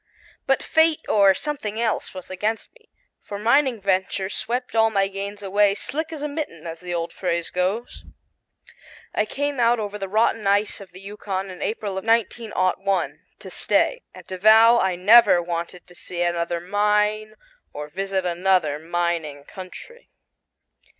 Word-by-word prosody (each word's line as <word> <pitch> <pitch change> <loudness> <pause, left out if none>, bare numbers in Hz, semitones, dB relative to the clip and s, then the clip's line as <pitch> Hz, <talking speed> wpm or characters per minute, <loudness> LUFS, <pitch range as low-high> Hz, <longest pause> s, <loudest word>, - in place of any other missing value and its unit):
But 270 - +2
fate 320 -1 +3
or 200 -2 +5
something 225 -7 -4
else 230 -2 -1
was 185 0 -10
against 215 +4 -3
me, 455 -2 -25 0.3
for 200 - -7
mining 235 +3 +2
ventures 190 0 -1
swept 245 +3 -3
all 225 0 +4
my 195 -2 +1
gains 200 +1 -6
away 200 +1 +3
"slick 315 +8 -3
as 305 -2 -6
a - - 0
mitten," 285 - -6
as 165 0 -6
the 180 -1 -7
old 170 -1 -3
phrase 170 -2 -2
goes. 190 +6 -2 1.1
I 215 - +1
came 285 -1 -3
out 235 0 +3
over 210 -1 -4
the 195 -1 -5
rotten 220 0 +1
ice 205 +1 +2
of 195 - -12
the 185 - -12
Yukon 195 -1 -5
in 180 - -10
April 205 -3 -3
of - - -11
1901 195 -5 0 0.2
to - - -11
stay, - - +1
and - - -14
to 185 -1 -6
vow 225 +3 +7
I 190 -3 +1
never 205 +1 +6
wanted 170 +1 -5
to 175 - -17
see 175 0 -4
another 170 0 -1
mine 210 +3 0 0.4
or 150 0 -7
visit 190 +3 -2
another 175 -4 +1
mining 165 -3 -2
country. 190 - -11
200 Hz, 160 wpm, -23 LUFS, 180-225 Hz, 1.1 s, vow